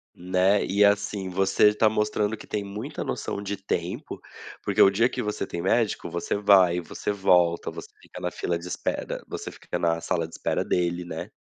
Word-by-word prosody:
Né, 95 +3 +2
e 100 +2 +3
assim, 100 -1 +1
você 95 +3 +3
tá 110 +1 +3
mostrando 105 0 0
que - - -12
tem 105 -1 -3
muita 100 +2 -6
noção 100 - -3
de 100 0 -3
tempo, 95 0 -4 0.4
porque - - +1
o - - +9
dia 110 +5 +3
que 125 - -4
você 105 0 -3
tem 85 - -4
médico, 100 -1 +1
você 85 0 -2
vai, 95 -4 +5
você 85 - -4
volta, 90 -4 +2
você - - -9
fica - - -11
na - - -2
fila 85 -1 -2
de 85 - -9
espera 90 - -3
você - - -6
fica - - -6
na 85 -1 +1
sala 85 -2 -1
de 80 - -18
espera - - -1
dele, 90 0 0
né. 80 -2 -6
95 Hz, 195 wpm, -26 LUFS, 90-105 Hz, 0.4 s, o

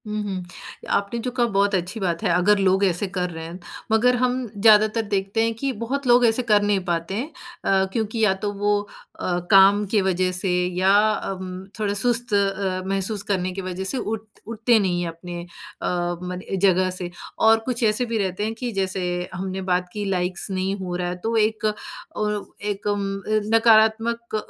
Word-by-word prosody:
हुँ, 210 0 -2
हुँ। 190 -3 -4 0.5
आपने 200 +4 0
जो 250 - -1
कहा 245 -1 +1
बहुत 200 -1 +2
अच्छी 185 +5 -2
बात 175 -4 -2
है - - +1
अगर 185 +4 +4
लोग 190 0 +3
ऐसे 185 +2 0
कर 180 -1 -2
रहे 160 -1 -7
हैं, 170 +3 -8 0.3
मगर 245 +3 +4
हम 255 0 0
ज़्यादातर 215 +1 +5
देखते 200 +2 0
हैं 230 0 0
कि 270 +4 -2
बहुत 265 +3 -2
लोग 245 0 +6
ऐसे 225 +2 +3
कर 210 -3 +4
नहीं 205 -1 +2
पाते 170 0 -2
हैं। 245 +7 -2 0.4
अ, 190 -1 +3
क्योंकि 225 0 -2
या 190 - +3
तो 205 - 0
वो 205 +1 +1 0.4
अ, 175 -1 0
काम 195 +1 +7
की 205 +1 +1
वजह 185 -1 +1
से 185 +1 -2 0.3
या 185 +1 +3 0.2
अम, 185 -2 -5
थोड़ा 205 -2 0
सुस्त 240 +2 0
अ, 195 -2 0
महसूस 195 +1 -1
करने 185 -3 -1
की 195 - -4
वजह 185 0 -4
से 195 +8 -2
उठ 220 -3 -3 0.2
उठते 230 +1 +2
नहीं 180 -3 0
हैं 175 - -2
अपने 175 +1 -7
अ, 175 0 -9 0.3
मन 180 0 -5 0.2
जगह 185 -1 +4
से, 180 -1 -3 0.3
और 225 0 +5
कुछ 245 -2 -2
ऐसे 215 +3 +2
भी 230 -1 -2
रहते 195 -1 -2
हैं 220 +1 -1
कि 245 +1 -4
जैसे 190 -2 -2 0.3
हमने 190 +1 -4
बात 180 -1 0
की 210 -1 -3
लाइक्स 185 -1 -1
नहीं 190 +1 -1
हो 180 -2 -4
रहा 180 0 -2
है 180 - -3
तो 230 +1 -1
एक 215 0 +1 0.5
ओ 210 - 0 0.4
एक 205 0 -4
उम, 205 -1 0 0.2
अ, 215 +2 0 0.2
नकारात्मक 225 +1 +3
200 Hz, 195 wpm, -23 LUFS, 185-220 Hz, 0.5 s, काम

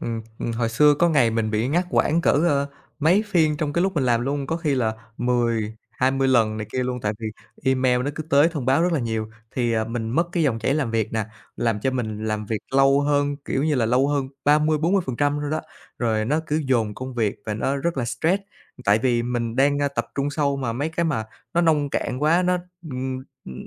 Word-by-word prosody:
ừm, 115 -1 -3 0.2
ừm, 115 - -2
hồi 115 0 0
xưa 150 +5 +5
có 170 +4 +3
ngày 135 -8 +3
mình 110 -1 -1
bị 110 +3 0
ngắt 175 +4 +1
quãng 165 +3 +2
cỡ, - - +3
ơ, 145 -2 +2 0.3
mấy 180 +8 +4
phiên 160 -6 +2
trong 145 -1 -2
cái 170 - +1
lúc 190 0 0
mình 140 -5 +1
làm 120 -2 +2
luôn, 140 +2 -2
có 165 - -1
khi 155 -5 0
là 115 -4 0 0.2
10, 115 -3 0 0.2
20 135 +1 +1
lần 110 -4 +3
này 110 -1 -4
kia 130 - 0
luôn, 125 0 -3
tại 105 -2 -1
vì 110 - -5 0.4
email 130 -1 +2
nó 145 - -1
cứ 155 - -4
tới 145 +1 +4
thông 145 -7 -5
báo 135 +5 +3
rất 175 0 +2
là 155 - +1
nhiều. 110 -2 -3 0.2
Thì, 120 -2 0
à, 110 -1 +1
mình 115 -1 -4
mất 170 +7 +1
cái 170 -2 +1
dòng 130 -6 +1
chảy 130 +5 0
làm 140 -7 0
việc 110 -1 -1
nè, 110 -2 0 0.3
làm 115 -3 0
cho 130 - +1
mình 110 -4 -3
làm 105 -1 -2
việc 110 0 -1 0.2
lâu 135 +1 +5
hơn, 145 0 +1
kiểu 135 - -1
như 155 -2 +2
là, 115 -4 +2
lâu 125 +4 +3
hơn 140 -2 0 0.2
30-40% 150 -1 +2
luôn 145 - -3
đó, 155 - 0 0.4
rồi 110 -3 +1
nó 150 +7 +1
cứ 155 +2 0
dồn 115 -5 +1
công 130 +2 -7
việc 110 -4 0
và 105 - -2
nó 135 +6 -1
rất 165 +3 -2
là 120 - 0
stress. 175 +10 0 0.4
Tại 105 +1 +4
vì 120 -1 +1
mình 120 -1 -2
đang, 140 +1 +3
ơ, 145 - +1
tập 115 -4 -3
trung 140 +1 -1
sâu 145 -1 0
mà 125 -4 -2
mấy 140 +6 -2
cái 170 +1 -1
mà 115 -9 0 0.3
nó 170 - +4
nông 150 -4 +2
cạn 125 - -2
quá 165 +4 +4
nó, 180 0 +2 0.3
ừm, 130 0 -3 0.3
ừm, 65 -1 -9
130 Hz, 240 wpm, -23 LUFS, 115-150 Hz, 0.4 s, xưa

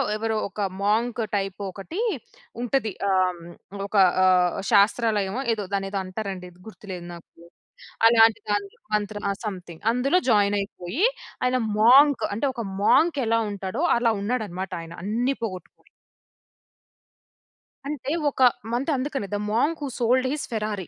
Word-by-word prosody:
ఎవరో 220 0 -1
ఒక 205 +2 -6 0.2
monk 225 +4 +1 0.2
type 195 0 -2
ఒకటి 205 - -7 0.6
ఉంటది. 245 -3 0 0.2
ఆహ్, 185 -1 +3
హ్మ్. 175 +3 -11
ఒక 210 - -8 0.3
ఆహ్, 180 -1 +4 0.2
శాస్త్రాలయమో 210 +1 +2
ఏదో, 210 -3 -4
దాన్నేదో 195 0 -1
అంటరండి. 185 -1 -6 0.2
గుర్తులేదు 185 -5 -8
నాకు. 170 - -13 0.8
అలాంటి 225 -1 +5
దాంట్లో 205 -1 -2 0.2
మంత్ర 210 0 -2
ఆహ్, 200 - -2
సంథింగ్. 180 -4 -7
అందులో 275 +9 +2
జాయినయిపోయి, 205 - +1 0.4
ఆయన 250 0 +2 0.2
మోంక్ 265 +5 +6
అంటే 250 +7 0
ఒక 235 -3 -4 0.2
మోంకెలా 245 -3 +3
ఉంటాడో, 200 - -4
అలా 235 -1 +2
ఉన్నాడమాట 200 -5 -3
ఆయన 165 0 -10
అన్నీ 240 +6 0
పోగొట్టుకుని. 185 -4 -7 2.0
అంటే, 285 -1 -4 0.2
ఒక 265 - -6 0.3
మంత్ 270 +6 0
అందుకనే 265 -5 -3
'the - - +1
monk 295 +9 +1
who - - -2
sold 255 +2 +2
his 300 - -3
Ferrari' 210 -5 -3
215 Hz, 125 wpm, -24 LUFS, 195-245 Hz, 2.0 s, మోంక్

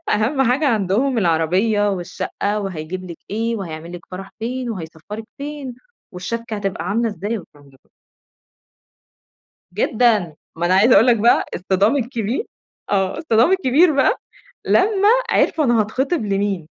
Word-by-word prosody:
أهم 240 +6 +1
حاجة 285 +5 +1
عندهم 225 +4 +1
العربية 190 +5 +2
والشقة، 200 +3 -3
وهيجيب 185 -1 -5
لِك 170 -2 -8
ايه، 225 +2 -1
وهيعمل 170 -3 -7
لِك 175 -1 -10
فرح 195 +1 -8
فين، 245 +2 -3
وهيسفرِك 185 +3 -7
فين، 285 -3 -6 0.4
والشَبْكَة 225 +5 -5
هتبقى 195 -3 -3
عاملة 230 +3 +1
إزاي، 210 +3 -3
والكلام 145 -6 -16
ده 135 - -22
كله. - - -37 1.8
جدًا، 210 -4 +1 0.2
ما 170 - 0
أنا 185 - +3
عايزة 215 +6 +5
أقول 220 +5 +6
لك 240 - +5
بقى 230 +2 +4
الصِدام 195 +7 +1
الكبير 240 - -2 0.5
آه، 195 +6 0
الصِدام 240 -2 +3
الكبير 330 -2 +4
بقى 280 - +3 0.5
لمّا 405 0 +3 0.2
عرفوا 315 - +2
أنا 240 -3 +3
هاتخطب 265 +7 -1
لمين، 195 -4 -1
215 Hz, 140 wpm, -20 LUFS, 185-245 Hz, 1.8 s, أقول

